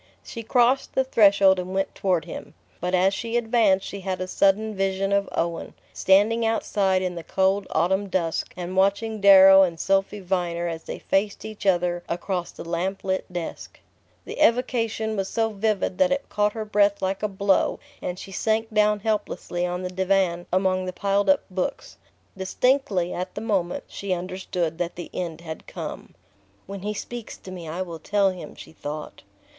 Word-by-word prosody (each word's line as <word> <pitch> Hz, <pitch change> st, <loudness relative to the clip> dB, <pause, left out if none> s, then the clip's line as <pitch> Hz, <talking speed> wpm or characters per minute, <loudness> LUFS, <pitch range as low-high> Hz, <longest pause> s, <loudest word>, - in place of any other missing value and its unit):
She 230 Hz, -, -7 dB
crossed 245 Hz, +3 st, +2 dB
the 265 Hz, -, +3 dB
threshold 200 Hz, -6 st, +5 dB
and 185 Hz, +1 st, -5 dB
went 195 Hz, -, -1 dB
toward 180 Hz, -5 st, 0 dB
him; 175 Hz, -, -9 dB, 0.2 s
but 180 Hz, +1 st, 0 dB
as 190 Hz, +2 st, +3 dB
she 230 Hz, +3 st, -2 dB
advanced 225 Hz, -5 st, +2 dB
she 200 Hz, -, -6 dB
had 190 Hz, -1 st, -3 dB
a 185 Hz, -, -2 dB
sudden 205 Hz, +3 st, +2 dB
vision 195 Hz, 0 st, -1 dB
of 200 Hz, 0 st, +1 dB
Owen, 170 Hz, 0 st, -3 dB, 0.2 s
standing 210 Hz, +5 st, +3 dB
outside 200 Hz, -4 st, +1 dB
in 180 Hz, -1 st, -2 dB
the 170 Hz, -1 st, -7 dB
cold 190 Hz, +3 st, +1 dB
autumn 190 Hz, +5 st, +1 dB
dusk 170 Hz, -3 st, -1 dB
and 180 Hz, +1 st, -5 dB
watching 200 Hz, +3 st, +1 dB
Darrow 195 Hz, -1 st, +9 dB
and 170 Hz, -4 st, +1 dB
Sophy 195 Hz, +3 st, +1 dB
Viner 175 Hz, -2 st, -1 dB
as 165 Hz, -1 st, -5 dB
they -, -, -5 dB
faced 200 Hz, +2 st, -1 dB
each 215 Hz, -2 st, -6 dB
other 175 Hz, -1 st, +2 dB
across 175 Hz, +1 st, -2 dB
the -, -, -10 dB
lamplit 190 Hz, +2 st, -2 dB
desk...The 175 Hz, -2 st, -9 dB
evocation 230 Hz, -3 st, +1 dB
was 195 Hz, -1 st, -2 dB
so 225 Hz, -1 st, 0 dB
vivid 205 Hz, -2 st, -1 dB
that 275 Hz, -1 st, +4 dB
it 280 Hz, 0 st, -1 dB
caught 210 Hz, 0 st, +1 dB
her 220 Hz, -1 st, -4 dB
breath 205 Hz, -1 st, +2 dB
like 190 Hz, +1 st, -1 dB
a 210 Hz, -, +1 dB
blow, 200 Hz, -1 st, +1 dB, 0.2 s
and 180 Hz, -, -4 dB
she 195 Hz, -, -9 dB
sank 220 Hz, +3 st, -1 dB
down 210 Hz, -1 st, +3 dB
helplessly 205 Hz, -4 st, -2 dB
on 180 Hz, +1 st, -3 dB
the 180 Hz, -, -3 dB
divan 185 Hz, -2 st, +1 dB
among 185 Hz, 0 st, +1 dB
the 185 Hz, -, -4 dB
piled 200 Hz, +3 st, +1 dB
up 285 Hz, -, +4 dB
books. 185 Hz, 0 st, -4 dB, 0.4 s
Distinctly, 190 Hz, -2 st, +1 dB
at 180 Hz, +1 st, -5 dB
the 205 Hz, -, -4 dB
moment, 195 Hz, -6 st, -1 dB
she 200 Hz, -2 st, -3 dB
understood 180 Hz, -2 st, -3 dB
that 175 Hz, -1 st, -2 dB
the 175 Hz, -, -8 dB
end 170 Hz, -2 st, -4 dB
had 160 Hz, -2 st, -8 dB
come. -, -, -7 dB, 0.5 s
"When 200 Hz, +1 st, -7 dB
he 210 Hz, +2 st, -3 dB
speaks 240 Hz, +1 st, -7 dB
to 185 Hz, -, -11 dB
me 175 Hz, -3 st, -8 dB
I 175 Hz, +4 st, -3 dB
will 170 Hz, -3 st, -8 dB
tell 200 Hz, +3 st, +2 dB
him!" 180 Hz, -1 st, -9 dB
she -, -, -12 dB
thought... 150 Hz, -1 st, -7 dB
195 Hz, 180 wpm, -24 LUFS, 180-210 Hz, 0.5 s, Darrow